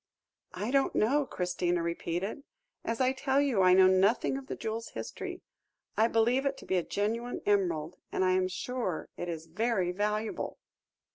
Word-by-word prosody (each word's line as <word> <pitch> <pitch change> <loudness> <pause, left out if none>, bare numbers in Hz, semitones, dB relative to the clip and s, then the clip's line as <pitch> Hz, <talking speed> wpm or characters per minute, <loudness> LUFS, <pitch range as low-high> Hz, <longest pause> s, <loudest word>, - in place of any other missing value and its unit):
"I 215 +4 -2
don't 275 0 +2
know," 275 +6 +3
Christina 180 -1 -1
repeated; 170 +7 -3 0.4
"as 230 0 -2
I 260 0 +3
tell 265 +1 +1
you, 270 -8 +2
I 185 -1 +6
know 190 0 +7
nothing 190 +7 +3
of 270 -1 -6
the - - -4
jewel's 225 +1 -4
history. - - -6 0.5
I 220 - +4
believe 235 +4 +2
it 275 -1 -1
to - - -11
be 190 - +1
a - - +3
genuine 230 +6 -2
emerald, 180 -4 +1
and 190 - +1
I 185 - +3
am 185 0 +2
sure 190 -1 -3
it 175 - -4
is 165 -1 -5
very 190 +1 0
valuable." 210 +3 -2
205 Hz, 170 wpm, -30 LUFS, 180-240 Hz, 0.5 s, know